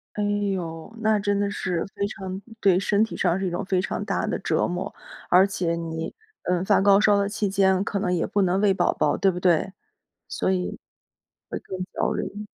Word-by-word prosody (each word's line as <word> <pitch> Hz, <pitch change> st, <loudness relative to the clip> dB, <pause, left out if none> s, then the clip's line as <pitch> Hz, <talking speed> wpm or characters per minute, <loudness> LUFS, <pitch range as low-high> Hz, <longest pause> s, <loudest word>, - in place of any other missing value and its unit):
哎 210 Hz, -, -1 dB
呦， 195 Hz, -5 st, -2 dB
那 220 Hz, -1 st, +3 dB
真 205 Hz, 0 st, 0 dB
的 200 Hz, 0 st, 0 dB
是 180 Hz, -4 st, -2 dB
非 200 Hz, 0 st, 0 dB
常 190 Hz, -2 st, -6 dB, 0.2 s
对 185 Hz, -2 st, +4 dB
身 200 Hz, +2 st, +2 dB
体 225 Hz, -, -4 dB
上 180 Hz, 0 st, +1 dB
是 195 Hz, -, -2 dB
一 180 Hz, -, -1 dB
种 175 Hz, -, -2 dB
非 190 Hz, -1 st, 0 dB
常 185 Hz, -, -2 dB
大 -, -, -1 dB
的 -, -, -2 dB
折 -, -, +1 dB
磨， 180 Hz, +3 st, -4 dB, 0.4 s
而 185 Hz, +2 st, +7 dB
且 180 Hz, -4 st, -1 dB
你， 165 Hz, -1 st, -4 dB, 0.3 s
嗯， 180 Hz, 0 st, 0 dB
发 -, -, +4 dB
高 200 Hz, 0 st, +6 dB
烧 210 Hz, -1 st, +5 dB
的 200 Hz, 0 st, +1 dB
期 205 Hz, 0 st, -1 dB
间 190 Hz, 0 st, +3 dB
可 200 Hz, -, -2 dB
能 180 Hz, -, 0 dB
也 175 Hz, -2 st, +1 dB
不 205 Hz, -, 0 dB
能 185 Hz, 0 st, +2 dB
喂 200 Hz, -2 st, +4 dB
宝 -, -, +2 dB
宝， -, -, +1 dB
对 195 Hz, -, +3 dB
不 180 Hz, -1 st, -2 dB
对？ 180 Hz, +1 st, +2 dB, 0.6 s
所 -, -, -1 dB
以 180 Hz, -1 st, -2 dB, 0.7 s
会 -, -, -3 dB
更 190 Hz, -, -8 dB, 0.2 s
招 -, -, 0 dB
人 210 Hz, +1 st, -4 dB
190 Hz, 230 characters per minute, -25 LUFS, 180-200 Hz, 0.7 s, 而